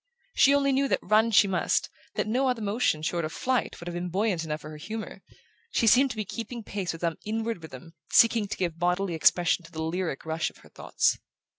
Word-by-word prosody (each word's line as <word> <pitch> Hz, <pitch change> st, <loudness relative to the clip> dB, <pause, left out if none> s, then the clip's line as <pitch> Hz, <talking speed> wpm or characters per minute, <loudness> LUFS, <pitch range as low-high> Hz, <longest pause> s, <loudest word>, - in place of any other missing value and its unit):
She 280 Hz, +1 st, +5 dB
only 275 Hz, -1 st, +2 dB
knew 275 Hz, +1 st, +2 dB
that -, -, +2 dB
run 215 Hz, +3 st, +3 dB
she 210 Hz, -2 st, +5 dB
must, 185 Hz, -3 st, +1 dB, 0.3 s
that -, -, 0 dB
no 250 Hz, +5 st, +1 dB
other 250 Hz, -2 st, -1 dB
motion, 205 Hz, -7 st, 0 dB
short 170 Hz, +1 st, -1 dB
of 155 Hz, -, -3 dB
flight, 255 Hz, +6 st, -1 dB
would 170 Hz, -, -9 dB
have 175 Hz, -, -4 dB
been 175 Hz, +1 st, -3 dB
buoyant 190 Hz, -2 st, 0 dB
enough 155 Hz, -1 st, -4 dB
for 155 Hz, -, -9 dB
her 155 Hz, -, -9 dB
humour. 220 Hz, +8 st, -7 dB, 0.5 s
She 235 Hz, -, +1 dB
seemed 260 Hz, +5 st, +5 dB
to 225 Hz, -, -5 dB
be 215 Hz, -, -2 dB
keeping 230 Hz, +3 st, -6 dB
pace 195 Hz, -3 st, -3 dB
with 165 Hz, -, -9 dB
some 165 Hz, -2 st, -1 dB
inward 225 Hz, -2 st, -3 dB
rhythm, 160 Hz, +1 st, -11 dB, 0.2 s
seeking 230 Hz, -2 st, +5 dB
to -, -, -5 dB
give 170 Hz, -3 st, -2 dB
bodily 180 Hz, +1 st, 0 dB
expression 175 Hz, +2 st, +3 dB
to 165 Hz, -, -15 dB
the 160 Hz, -1 st, -4 dB
lyric 165 Hz, -3 st, -3 dB
rush 160 Hz, 0 st, -1 dB
of -, -, -21 dB
her -, -, -16 dB
thoughts. -, -, 0 dB
190 Hz, 230 wpm, -27 LUFS, 165-225 Hz, 0.5 s, She